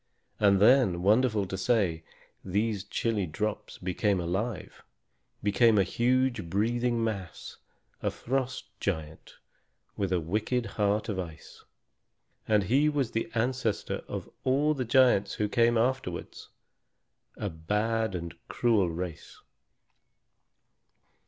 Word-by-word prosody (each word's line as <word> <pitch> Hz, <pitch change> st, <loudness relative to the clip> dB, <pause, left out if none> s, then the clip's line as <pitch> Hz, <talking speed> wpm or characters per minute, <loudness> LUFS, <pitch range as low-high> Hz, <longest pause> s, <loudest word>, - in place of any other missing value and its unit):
And 100 Hz, -2 st, +4 dB
then, 105 Hz, -6 st, +4 dB
wonderful 110 Hz, 0 st, +3 dB
to 95 Hz, -, -5 dB
say, 95 Hz, -5 st, +1 dB, 0.4 s
these 100 Hz, +1 st, -1 dB
chilly 105 Hz, -1 st, -1 dB
drops 105 Hz, +7 st, -4 dB
became 95 Hz, +2 st, 0 dB
alive; 95 Hz, +4 st, -3 dB, 0.6 s
became 110 Hz, +2 st, +4 dB
a 100 Hz, -, +5 dB
huge, 120 Hz, -1 st, +1 dB
breathing 120 Hz, +4 st, 0 dB
mass, 100 Hz, -7 st, -5 dB, 0.4 s
a -, -, +1 dB
Frost 130 Hz, 0 st, -3 dB
Giant 80 Hz, -5 st, -4 dB, 0.6 s
with 100 Hz, -2 st, -2 dB
a 90 Hz, -, +2 dB
wicked 110 Hz, +9 st, -1 dB
heart 105 Hz, -1 st, 0 dB
of 100 Hz, -4 st, -2 dB
ice. 80 Hz, -3 st, -9 dB, 0.8 s
And 105 Hz, -2 st, +3 dB
he 135 Hz, +9 st, +3 dB
was 140 Hz, -6 st, -1 dB
the 115 Hz, -, -2 dB
ancestor 120 Hz, -1 st, -1 dB
of -, -, -5 dB, 0.2 s
all 140 Hz, +4 st, +2 dB
the 130 Hz, -4 st, -3 dB
giants 120 Hz, -5 st, +4 dB
who 105 Hz, -, 0 dB
came 115 Hz, +2 st, +3 dB
afterwards, 120 Hz, -7 st, -2 dB, 0.9 s
a 100 Hz, -3 st, -3 dB
bad 105 Hz, +6 st, -1 dB
and 85 Hz, -3 st, -5 dB
cruel 110 Hz, -7 st, +2 dB
race. 85 Hz, -1 st, -6 dB
105 Hz, 115 wpm, -29 LUFS, 95-120 Hz, 0.9 s, a